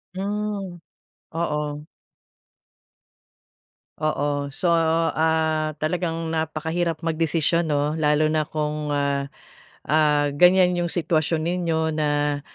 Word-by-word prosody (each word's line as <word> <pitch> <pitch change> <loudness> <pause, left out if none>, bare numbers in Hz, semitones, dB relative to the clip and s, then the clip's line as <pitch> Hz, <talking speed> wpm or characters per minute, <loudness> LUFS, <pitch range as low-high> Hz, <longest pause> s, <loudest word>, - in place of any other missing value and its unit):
Hmm, 200 -1 -3 0.5
oo. 150 -2 -3 2.1
Oo 145 -2 -1
so, 170 +5 0
ah, 160 -1 +1
talagang 165 +1 -2
napakahirap 160 +1 -2
magdesisyon 165 0 +1
no 145 +1 +1
lalo 150 -1 +2
na 155 0 +1
kung 150 0 -3
ah, 140 -1 -1 0.6
ah, 150 -1 +2
ganyan 180 +3 +5
yung 175 -1 -1
sitwasyon 160 -1 0
ninyo 165 -2 0
na, 145 -1 0
160 Hz, 90 wpm, -23 LUFS, 150-170 Hz, 2.1 s, ganyan